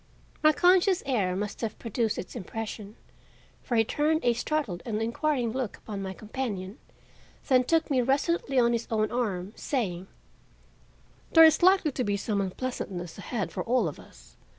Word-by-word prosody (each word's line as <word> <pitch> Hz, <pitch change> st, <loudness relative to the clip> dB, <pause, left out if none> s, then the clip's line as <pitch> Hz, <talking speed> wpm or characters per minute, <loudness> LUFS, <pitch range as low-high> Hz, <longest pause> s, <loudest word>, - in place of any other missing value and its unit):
My 310 Hz, -, +6 dB
conscious 360 Hz, +3 st, +4 dB
air 205 Hz, -9 st, 0 dB
must 205 Hz, +2 st, -4 dB
have 225 Hz, -2 st, -3 dB
produced 230 Hz, -1 st, -1 dB
its 185 Hz, -, -7 dB
impression, 215 Hz, 0 st, -6 dB, 0.7 s
for 240 Hz, -, -3 dB
he 225 Hz, -, +5 dB
turned 305 Hz, +5 st, 0 dB
a 240 Hz, -, +4 dB
startled 240 Hz, -, -2 dB
and 215 Hz, -2 st, -2 dB
inquiring 240 Hz, +2 st, 0 dB
look 255 Hz, -3 st, -3 dB
upon 205 Hz, -3 st, -7 dB
my 190 Hz, -1 st, -4 dB
companion, 210 Hz, -1 st, -5 dB, 0.7 s
then 255 Hz, -1 st, +5 dB
took 325 Hz, +1 st, +1 dB
me 260 Hz, -2 st, +3 dB
resolutely 275 Hz, +2 st, 0 dB
on 240 Hz, -1 st, +4 dB
his 235 Hz, 0 st, -2 dB
own 215 Hz, -1 st, 0 dB
arm, 205 Hz, -5 st, -2 dB
saying: 190 Hz, -, -2 dB, 1.3 s
"There 325 Hz, -1 st, +10 dB
is 315 Hz, -1 st, +5 dB
likely 370 Hz, -3 st, +5 dB
to 255 Hz, -, -2 dB
be 205 Hz, -2 st, 0 dB
some 200 Hz, 0 st, -1 dB
unpleasantness 190 Hz, -4 st, -5 dB
ahead 200 Hz, -5 st, -3 dB
for -, -, -4 dB
all 250 Hz, +2 st, +2 dB
of -, -, -6 dB
us. -, -, -17 dB
235 Hz, 165 wpm, -28 LUFS, 205-275 Hz, 1.3 s, There